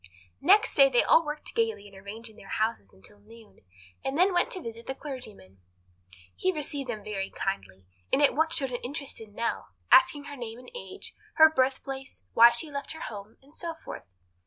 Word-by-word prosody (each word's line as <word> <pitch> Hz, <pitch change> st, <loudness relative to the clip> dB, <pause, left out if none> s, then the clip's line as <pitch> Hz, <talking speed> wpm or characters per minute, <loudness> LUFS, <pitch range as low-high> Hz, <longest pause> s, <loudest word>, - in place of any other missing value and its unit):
Next 410 Hz, -, +5 dB
day -, -, +7 dB
they -, -, +4 dB
all 330 Hz, -, +5 dB
worked 300 Hz, 0 st, -6 dB
gaily 220 Hz, -3 st, 0 dB
in 200 Hz, -, -16 dB
arranging 215 Hz, +3 st, -9 dB
their 195 Hz, -, -14 dB
houses 215 Hz, -, -1 dB
until 100 Hz, -, -14 dB
noon, 220 Hz, +1 st, -17 dB, 0.4 s
and 270 Hz, +2 st, -2 dB
then 370 Hz, +2 st, +4 dB
went 350 Hz, -, +2 dB
to 375 Hz, -, -4 dB
visit 230 Hz, -6 st, -8 dB
the 265 Hz, -, -3 dB
clergyman. 220 Hz, -, -8 dB, 0.8 s
He 375 Hz, -, +1 dB
received 290 Hz, -5 st, -4 dB
them 215 Hz, -3 st, -4 dB
very 195 Hz, -2 st, -3 dB
kindly, 95 Hz, -, -4 dB, 0.3 s
and -, -, +3 dB
at 290 Hz, -, +5 dB
once 320 Hz, +2 st, +1 dB
showed 270 Hz, -3 st, 0 dB
an 245 Hz, -, -4 dB
interest 275 Hz, -1 st, -5 dB
in 210 Hz, -2 st, -13 dB
Nell, 230 Hz, -, -2 dB, 0.2 s
asking 295 Hz, -13 st, +6 dB
her 290 Hz, 0 st, -8 dB
name 235 Hz, -3 st, -7 dB
and 250 Hz, -, -13 dB
age, 485 Hz, -, -8 dB, 0.2 s
her 315 Hz, -1 st, +8 dB
birthplace, 265 Hz, -1 st, -2 dB
why 235 Hz, +1 st, +9 dB
she 240 Hz, +6 st, -2 dB
left 280 Hz, +2 st, -3 dB
her 320 Hz, -, -10 dB
home, 205 Hz, 0 st, -8 dB
and 285 Hz, +2 st, -19 dB
so 335 Hz, 0 st, -5 dB
forth. 320 Hz, -, -9 dB
255 Hz, 195 wpm, -28 LUFS, 215-300 Hz, 0.8 s, why